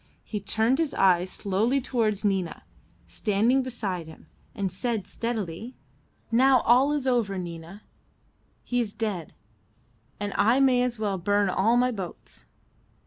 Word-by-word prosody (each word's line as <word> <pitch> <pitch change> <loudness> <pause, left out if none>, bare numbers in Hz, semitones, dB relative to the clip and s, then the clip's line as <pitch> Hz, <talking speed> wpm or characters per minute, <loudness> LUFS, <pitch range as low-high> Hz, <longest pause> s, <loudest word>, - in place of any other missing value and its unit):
He 210 - -4
turned 225 +6 +1
his 320 -3 0
eyes 180 -1 +3
slowly 210 +9 0
towards 225 -5 -1
Nina 190 -4 -1 0.4
standing 225 +5 +1
beside 205 -10 -4
him, 160 - -13 0.3
and 195 -2 -2
said 215 +1 -2
steadily 225 0 -4 0.6
"Now 255 +1 +5
all 255 +4 +4
is 295 -3 -1
over, 235 -7 +1
Nina. 175 +2 -8 0.8
He 245 - -1
is 220 -3 -2
dead, 210 -7 -4 0.8
and 205 -1 -3
I 235 +5 +3
may 260 -2 +4
as 250 -1 -1
well 205 -3 -2
burn 205 +2 +1
all 220 +6 +2
my 250 +1 +3
boats." 180 - -8
215 Hz, 140 wpm, -26 LUFS, 190-245 Hz, 0.8 s, Now